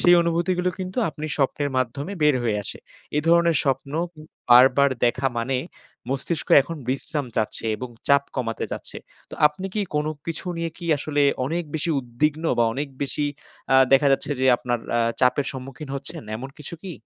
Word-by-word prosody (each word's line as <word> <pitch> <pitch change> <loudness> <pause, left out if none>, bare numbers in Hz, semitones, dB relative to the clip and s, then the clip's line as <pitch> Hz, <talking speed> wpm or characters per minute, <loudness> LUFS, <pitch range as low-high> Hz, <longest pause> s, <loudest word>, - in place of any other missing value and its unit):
সেই 175 - +7
অনুভূতিগুলো 175 +2 0
কিন্তু 185 +3 -4
আপনি 155 -1 -5
স্বপ্নের 145 0 0
মাধ্যমে 135 +8 -2
বের 150 -1 +5
হয়ে 110 -3 +1
আসে। - - -6 0.4
এ - - +4
ধরনের 170 -1 +5
স্বপ্ন 135 0 -1 0.6
বারবার 130 +3 +7 0.2
দেখা 130 +3 +1
মানে 130 +3 0 0.5
মস্তিষ্ক 140 +4 -2
এখন 165 +4 -7
বিশ্রাম 140 +2 -1
চাচ্ছে 110 +1 0
এবং 125 - -6 0.2
চাপ 140 0 +5
কমাতে 115 -3 -2
চাচ্ছে। - - -5 0.3
তো, - - -7
আপনি 150 +6 -3
কি 210 - 0
কোনো 150 +1 +1 0.2
কিছু 165 +2 -4
নিয়ে 165 0 -2
কি 175 - -7
আসলে 145 0 0 0.2
অনেক 165 +6 -1
বেশি 155 +2 -1
উদ্বিগ্ন? 145 +6 -1
বা 120 - +5
অনেক 145 +4 -3
বেশি 145 +1 -1 0.5
আ - - +7 0.2
দেখা 135 +1 +6
যাচ্ছে, 135 - 0
যে 130 - +3
আপনার 120 -1 -2 0.2
আ - - +3 0.2
চাপের 130 +2 +3
সম্মুখীন 135 +2 -8
হচ্ছেন, 140 +3 -6
এমন 135 +4 -7
কিছু 150 +3 -7
কি? 190 -2 -6
145 Hz, 170 wpm, -24 LUFS, 130-165 Hz, 0.6 s, সেই